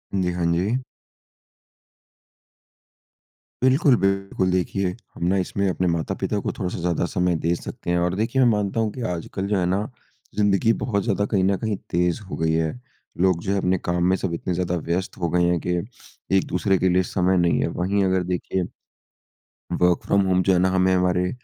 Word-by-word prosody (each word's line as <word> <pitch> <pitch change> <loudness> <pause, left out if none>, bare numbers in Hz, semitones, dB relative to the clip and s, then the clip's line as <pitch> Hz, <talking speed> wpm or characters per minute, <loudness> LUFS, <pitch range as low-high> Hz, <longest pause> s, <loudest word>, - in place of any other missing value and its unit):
जी। 90 -2 +1
हाँ 85 -1 -1
जी। 100 +9 0 2.8
बिल्कुल, 130 0 +5
बिल्कुल 95 -1 0
देखिए, 95 +1 0 0.3
हम - - -6
ना 95 +2 +2
इसमें 100 +1 -1
अपने 90 0 0
माता-पिता 80 -1 -2
को - - -2
थोड़ा-सा 90 -1 -2
ज़्यादा 85 0 0
समय 90 -3 +1
दे 85 - +3
सकते 85 - -7
हैं 85 - +2
और 90 +1 0
देखिए 115 +6 +1
मैं 125 - +5
मानता 105 +1 -1
हूँ 110 -1 +1
कि 125 - -7
आजकल 90 +3 -4
जो 105 0 +1
है 90 - +1
ना, 95 +3 +1 0.5
ज़िंदगी 105 +2 +3
बहुत 100 -5 0
ज़्यादा 100 -3 0
कहीं 95 -3 +2
न 95 0 +2
कहीं 110 0 -2
तेज़ 90 +3 0
हो - - -4
गई 80 0 +1
है। 80 -1 +1 0.5
लोग 90 -3 +3
जो 95 - -1
है 100 - +1
अपने 95 -1 +1
काम 85 0 -1
में 95 - +4
सब 90 -3 -3
इतने 90 +2 -2
ज़्यादा 90 0 -1
व्यस्त 90 +3 -2
हो 85 -3 -1
गए 90 +1 +2
हैं 85 -1 +1
कि 90 - +1 0.6
एक-दूसरे 95 +1 +1
के 95 +1 +2
लिए 90 +1 +3
समय 95 0 +1
नहीं 85 -1 +2
है, - - +1
वहीं 95 +3 0
अगर 95 -1 +1
देखिए 90 +1 -2 1.1
वर्क 90 -1 +2
फ्रॉम 100 - +3
होम 95 -1 +2
जो 95 - +3
है 90 - +3
ना, 95 - +3
हमें, 95 0 +2
हमारे 90 0 +1
95 Hz, 195 wpm, -23 LUFS, 90-100 Hz, 2.8 s, बिल्कुल